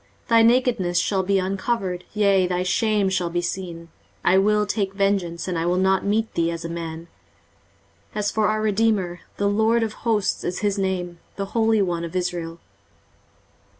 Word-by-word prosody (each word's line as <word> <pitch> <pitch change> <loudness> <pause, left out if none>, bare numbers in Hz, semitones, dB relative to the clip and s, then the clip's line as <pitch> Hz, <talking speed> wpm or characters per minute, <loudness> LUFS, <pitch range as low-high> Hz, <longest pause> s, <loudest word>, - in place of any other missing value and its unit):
23:047:003 - - -36
Thy 230 -1 +6
nakedness 230 -7 +2
shall 190 +2 +1
be 195 +1 +1
uncovered, 190 -1 -2
yea, 200 -3 +3
thy 180 0 -1
shame 210 +2 +1
shall 185 -2 0
be 175 +1 -1
seen: 175 -2 -5 0.4
I 185 +2 +5
will 210 +1 +2
take 200 -2 -2
vengeance, 195 -4 0
and 180 -3 -1
I 165 - -1
will 180 +1 +1
not 190 +1 +2
meet 220 +2 0
thee 170 0 +1
as 170 0 -5
a - - -4
man. 165 -1 -5
23:047:004 - - -20 1.1
As 205 -1 0
for 215 -1 +1
our 215 0 0
redeemer, 205 -4 +1 0.2
the 200 - +1
LORD 220 +3 +2
of 220 -1 -2
hosts 220 -4 0
is 180 - -3
his 200 0 0
name, 180 -3 -2 0.2
the 200 - -3
Holy 225 -2 +3
One 170 -2 -2
of 170 +1 -6
Israel. 175 -2 -3
190 Hz, 185 wpm, -23 LUFS, 175-210 Hz, 1.1 s, Thy